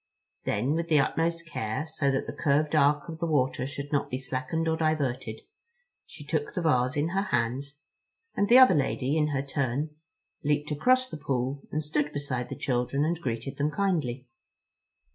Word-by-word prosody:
Then, 125 Hz, +8 st, 0 dB
with 165 Hz, +1 st, -1 dB
the 155 Hz, -, +5 dB
utmost 165 Hz, +4 st, +1 dB
care, 110 Hz, -3 st, -3 dB
so 155 Hz, -3 st, -1 dB
that 135 Hz, 0 st, 0 dB
the -, -, -5 dB
curved 150 Hz, 0 st, +1 dB
arc 145 Hz, 0 st, +3 dB
of 160 Hz, -1 st, -7 dB
the 170 Hz, -, -1 dB
water 130 Hz, -4 st, +1 dB
should 145 Hz, 0 st, -6 dB
not 145 Hz, -, 0 dB
be 130 Hz, -, -2 dB
slackened 130 Hz, +5 st, -2 dB
or 160 Hz, -, +2 dB
diverted, 140 Hz, -8 st, -1 dB, 0.7 s
she -, -, -11 dB
took 445 Hz, -, -2 dB
the 180 Hz, -, 0 dB
vase 130 Hz, -2 st, +2 dB
in 150 Hz, +3 st, +1 dB
her 195 Hz, +3 st, 0 dB
hands 135 Hz, -, -1 dB, 0.6 s
and 200 Hz, -, 0 dB
the 245 Hz, -, +8 dB
other 260 Hz, -6 st, +8 dB
lady 140 Hz, -2 st, 0 dB
in 155 Hz, -1 st, +2 dB
her 140 Hz, -2 st, -1 dB
turn 140 Hz, +1 st, -1 dB, 0.5 s
leaped 150 Hz, 0 st, 0 dB
across 255 Hz, -, +3 dB
the 205 Hz, -, -7 dB
pool 135 Hz, -1 st, -2 dB
and 155 Hz, +1 st, -1 dB
stood 150 Hz, 0 st, -1 dB
beside 130 Hz, -4 st, -3 dB
the -, -, -4 dB
children 130 Hz, +3 st, 0 dB
and 170 Hz, +1 st, -1 dB
greeted 125 Hz, +2 st, -3 dB
them 145 Hz, +1 st, +1 dB
kindly. 150 Hz, -9 st, -1 dB
145 Hz, 180 wpm, -28 LUFS, 130-160 Hz, 0.7 s, the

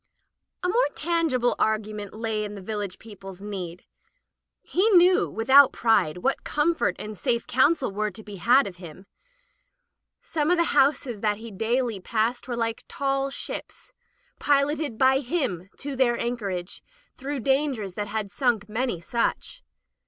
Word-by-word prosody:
A -, -, +1 dB
more 465 Hz, +7 st, +3 dB
tangible 310 Hz, -7 st, +1 dB
argument 215 Hz, -2 st, -1 dB
lay 220 Hz, -1 st, -2 dB
in 210 Hz, 0 st, -6 dB
the 200 Hz, -, -8 dB
vil 215 Hz, +2 st, -3 dB
lage 200 Hz, -3 st, -5 dB
people's 195 Hz, -3 st, -11 dB
need. 185 Hz, -4 st, -6 dB, 0.8 s
He 395 Hz, +5 st, +2 dB
knew, 360 Hz, -2 st, +5 dB
without 265 Hz, +5 st, +6 dB
pride, 225 Hz, -9 st, +2 dB
what 270 Hz, +9 st, -1 dB
comfort 320 Hz, +3 st, +1 dB
and 215 Hz, 0 st, -7 dB
safe 235 Hz, +2 st, -1 dB
counsel 265 Hz, 0 st, +2 dB
were 215 Hz, +2 st, -1 dB
to 215 Hz, +3 st, -10 dB
be 205 Hz, -2 st, -9 dB
had 250 Hz, +8 st, +4 dB
of 185 Hz, -3 st, -7 dB
him. 175 Hz, +1 st, -11 dB, 1.2 s
Some 305 Hz, -1 st, -1 dB
of 355 Hz, -, +3 dB
the 340 Hz, -, +4 dB
houses 275 Hz, -5 st, +2 dB
that 210 Hz, 0 st, 0 dB
he 225 Hz, +1 st, -9 dB
daily 225 Hz, +1 st, -1 dB
passed 230 Hz, +6 st, -1 dB
were 240 Hz, -2 st, -3 dB
like 230 Hz, -1 st, -2 dB
tall 275 Hz, 0 st, -1 dB
ships -, -, -6 dB, 0.5 s
piloted 285 Hz, -2 st, +1 dB
by 265 Hz, +1 st, +4 dB
him 245 Hz, -, -2 dB
to 280 Hz, 0 st, -5 dB
their 245 Hz, -2 st, +2 dB
anchorage 200 Hz, -7 st, -4 dB, 0.3 s
through 275 Hz, 0 st, -4 dB
dangers 265 Hz, -7 st, 0 dB
that 205 Hz, +2 st, -4 dB
had 205 Hz, -1 st, -3 dB
sunk 235 Hz, -5 st, 0 dB
many 225 Hz, -3 st, -2 dB
such. 230 Hz, +7 st, -2 dB
235 Hz, 150 wpm, -25 LUFS, 210-275 Hz, 1.2 s, without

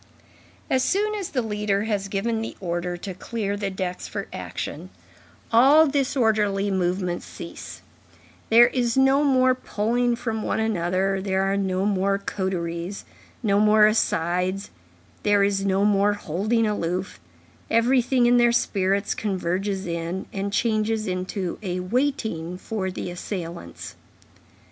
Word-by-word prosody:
As 260 Hz, -, +2 dB
soon 420 Hz, +2 st, +1 dB
as 400 Hz, -4 st, -3 dB
the 255 Hz, -4 st, -1 dB
leader 210 Hz, -2 st, -1 dB
has 205 Hz, -3 st, -1 dB
given 220 Hz, +3 st, -1 dB
the 225 Hz, -, -6 dB
order 175 Hz, -1 st, -3 dB
to 190 Hz, +2 st, -6 dB
clear 205 Hz, +1 st, -3 dB
the 200 Hz, -1 st, -2 dB
decks 185 Hz, -1 st, -4 dB
for -, -, -5 dB
action, -, -, -6 dB, 0.6 s
all 275 Hz, +7 st, +7 dB
disorderly 220 Hz, -8 st, +1 dB
movements 180 Hz, -1 st, -1 dB
cease; -, -, -9 dB, 0.7 s
there 235 Hz, +2 st, +7 dB
is 245 Hz, -1 st, 0 dB
no 270 Hz, +2 st, +4 dB
more 260 Hz, -2 st, +4 dB
pulling 240 Hz, 0 st, 0 dB
from 225 Hz, -2 st, -3 dB
one -, -, -1 dB
another; 195 Hz, -2 st, 0 dB
there 190 Hz, 0 st, 0 dB
are 195 Hz, 0 st, +1 dB
no 190 Hz, -1 st, 0 dB
more 195 Hz, -1 st, +1 dB
coteries; 185 Hz, -2 st, -4 dB, 0.4 s
no 200 Hz, -2 st, +3 dB
more 210 Hz, 0 st, +6 dB
asides, 185 Hz, -2 st, 0 dB, 0.5 s
there 205 Hz, -1 st, +3 dB
is 200 Hz, -1 st, +1 dB
no 195 Hz, +1 st, +2 dB
more 205 Hz, 0 st, +3 dB
holding 205 Hz, +5 st, 0 dB
aloof; 185 Hz, -2 st, -2 dB, 0.5 s
everything 245 Hz, +2 st, +3 dB
in 245 Hz, 0 st, +5 dB
their 240 Hz, 0 st, +5 dB
spirits 200 Hz, -4 st, +1 dB
converges 195 Hz, 0 st, -2 dB
in, 170 Hz, +2 st, -3 dB
and 200 Hz, 0 st, -2 dB
changes 215 Hz, 0 st, 0 dB
into, 185 Hz, 0 st, -3 dB
a 185 Hz, -3 st, -3 dB
waiting 185 Hz, -, -1 dB
for 195 Hz, -1 st, -3 dB
the 180 Hz, -1 st, -5 dB
assailants. 175 Hz, -, -6 dB
200 Hz, 135 wpm, -24 LUFS, 185-230 Hz, 0.7 s, all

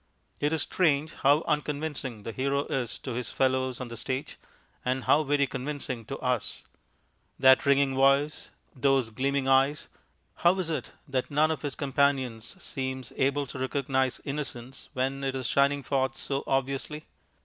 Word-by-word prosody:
It 145 Hz, +1 st, +1 dB
is 160 Hz, -4 st, +1 dB
strange 155 Hz, -3 st, +1 dB
how 145 Hz, +4 st, +5 dB
unconvincing 150 Hz, -6 st, -2 dB
the 115 Hz, -, -4 dB
Hero 140 Hz, +4 st, 0 dB
is 125 Hz, -4 st, -2 dB
to 130 Hz, -, -6 dB
his 120 Hz, -1 st, -3 dB
fellows 130 Hz, -1 st, +1 dB
on 125 Hz, -2 st, -5 dB
the 115 Hz, -, -6 dB
stage, 130 Hz, +4 st, -3 dB, 0.5 s
and 130 Hz, +1 st, 0 dB
how 150 Hz, -, +4 dB
very 145 Hz, -1 st, +2 dB
convincing 135 Hz, -3 st, -5 dB
to 135 Hz, -, -5 dB
us. 125 Hz, -3 st, -2 dB, 0.7 s
That 130 Hz, +1 st, +6 dB
ringing 140 Hz, -1 st, +4 dB
voice, 140 Hz, +3 st, +2 dB, 0.3 s
those 135 Hz, -3 st, +2 dB
gleaming 135 Hz, +3 st, 0 dB
eyes 135 Hz, +3 st, +3 dB, 0.5 s
how 175 Hz, +3 st, +4 dB
is 175 Hz, -3 st, -1 dB
it 155 Hz, -, -3 dB
that 130 Hz, -2 st, -1 dB
none 155 Hz, +2 st, +3 dB
of 160 Hz, -, -3 dB
his 145 Hz, -3 st, -3 dB
companions 135 Hz, -5 st, 0 dB
seems 130 Hz, -2 st, -4 dB
able 140 Hz, +1 st, +2 dB
to 130 Hz, -, -8 dB
recognize 130 Hz, -1 st, 0 dB
Innocence 135 Hz, -3 st, -5 dB
when 135 Hz, +1 st, -1 dB
it 135 Hz, -1 st, -1 dB
is 130 Hz, -1 st, -3 dB
shining 140 Hz, +2 st, +2 dB
forth 135 Hz, 0 st, 0 dB
so 135 Hz, +1 st, -2 dB
obviously? 135 Hz, +3 st, -1 dB
135 Hz, 160 wpm, -28 LUFS, 130-145 Hz, 0.7 s, That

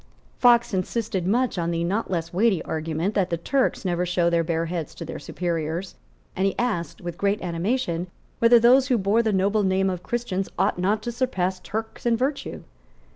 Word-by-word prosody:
Fox 240 Hz, -2 st, +5 dB
insisted 190 Hz, 0 st, -1 dB
much 240 Hz, -1 st, +1 dB
on 170 Hz, 0 st, -1 dB
the 170 Hz, 0 st, -1 dB
not 200 Hz, +6 st, -1 dB
less 170 Hz, -2 st, -3 dB
weighty 200 Hz, 0 st, +2 dB
argument 160 Hz, +5 st, -2 dB
that 190 Hz, -3 st, +1 dB
the 170 Hz, -, -1 dB
Turks 255 Hz, -, 0 dB
never 175 Hz, -1 st, 0 dB
show 175 Hz, -1 st, +1 dB
their 170 Hz, -1 st, +2 dB
bare 165 Hz, 0 st, -1 dB
heads 165 Hz, -3 st, -4 dB
to -, -, -7 dB
their -, -, -6 dB
superiors; 170 Hz, +3 st, -3 dB, 0.4 s
and 190 Hz, +1 st, +1 dB
he 195 Hz, -, -2 dB
asked, 190 Hz, -10 st, -2 dB
with 175 Hz, -1 st, -6 dB
great 200 Hz, +1 st, +1 dB
animation, 180 Hz, 0 st, -1 dB, 0.3 s
whether 230 Hz, +1 st, +7 dB
those 255 Hz, +3 st, +5 dB
who 250 Hz, -3 st, +3 dB
bore 205 Hz, +3 st, +2 dB
the 220 Hz, -2 st, 0 dB
noble 200 Hz, +2 st, +2 dB
name 190 Hz, 0 st, +2 dB
of 180 Hz, -1 st, -5 dB
Christians 195 Hz, -4 st, -2 dB
ought 190 Hz, 0 st, +1 dB
not 205 Hz, +4 st, +1 dB
to 240 Hz, -, -3 dB
surpass 190 Hz, -7 st, -1 dB
Turks 220 Hz, +5 st, -5 dB
in 230 Hz, -1 st, +3 dB
virtue. 275 Hz, +4 st, -3 dB
190 Hz, 190 wpm, -24 LUFS, 175-230 Hz, 0.4 s, whether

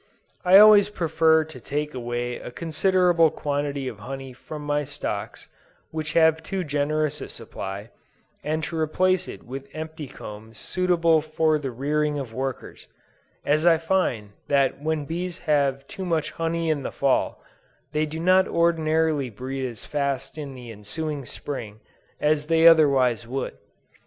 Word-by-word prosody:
I 180 Hz, +2 st, +8 dB
always 210 Hz, -1 st, +8 dB
prefer 160 Hz, -4 st, +3 dB
to 160 Hz, -, -11 dB
take 150 Hz, +1 st, -3 dB
away 120 Hz, 0 st, -3 dB
a -, -, -8 dB
considerable 170 Hz, +2 st, +2 dB
quantity 145 Hz, -2 st, -2 dB
of 115 Hz, -5 st, -6 dB
honey 135 Hz, +3 st, -7 dB
from 150 Hz, +4 st, -9 dB
my 145 Hz, 0 st, 0 dB
stocks, 145 Hz, +1 st, -5 dB, 0.4 s
which 155 Hz, -1 st, -4 dB
have 160 Hz, -1 st, +4 dB
too 185 Hz, +3 st, -3 dB
generous 150 Hz, 0 st, -1 dB
a -, -, -6 dB
supply, 100 Hz, -1 st, -7 dB, 0.5 s
and 155 Hz, +1 st, -1 dB
to 165 Hz, +1 st, -3 dB
replace 185 Hz, +4 st, +1 dB
it -, -, -9 dB
with 135 Hz, +2 st, -7 dB
empty 155 Hz, -1 st, -6 dB
combs 110 Hz, -3 st, -10 dB
suitable 170 Hz, -3 st, +2 dB
for 155 Hz, 0 st, +1 dB
the 140 Hz, -2 st, -4 dB
rearing 145 Hz, +4 st, -1 dB
of 130 Hz, -5 st, -5 dB
workers; 130 Hz, +1 st, -5 dB, 0.6 s
as 155 Hz, +3 st, +2 dB
I 165 Hz, -1 st, +6 dB
find 160 Hz, -, 0 dB, 0.2 s
that 140 Hz, -1 st, +2 dB
when 155 Hz, -1 st, -1 dB
bees 175 Hz, +3 st, -4 dB
have 140 Hz, -3 st, +1 dB
too 190 Hz, -, -7 dB
much 165 Hz, -4 st, -1 dB
honey 165 Hz, 0 st, -1 dB
in 150 Hz, -2 st, -1 dB
the -, -, -4 dB
Fall, 135 Hz, -2 st, +1 dB, 0.5 s
they 155 Hz, +1 st, 0 dB
do 160 Hz, +2 st, -6 dB
not 185 Hz, +2 st, +4 dB
ordinarily 160 Hz, -4 st, +1 dB
breed 130 Hz, +4 st, -4 dB
as 115 Hz, -, -11 dB
fast 140 Hz, -2 st, -2 dB
in 145 Hz, -3 st, -7 dB
the 120 Hz, -2 st, -9 dB
ensuing 135 Hz, +8 st, -5 dB
Spring, 115 Hz, -7 st, -6 dB, 0.4 s
as 150 Hz, 0 st, +1 dB
they 165 Hz, 0 st, +5 dB
otherwise 135 Hz, -8 st, +5 dB
would. 135 Hz, +3 st, -3 dB
150 Hz, 150 wpm, -24 LUFS, 135-160 Hz, 0.6 s, I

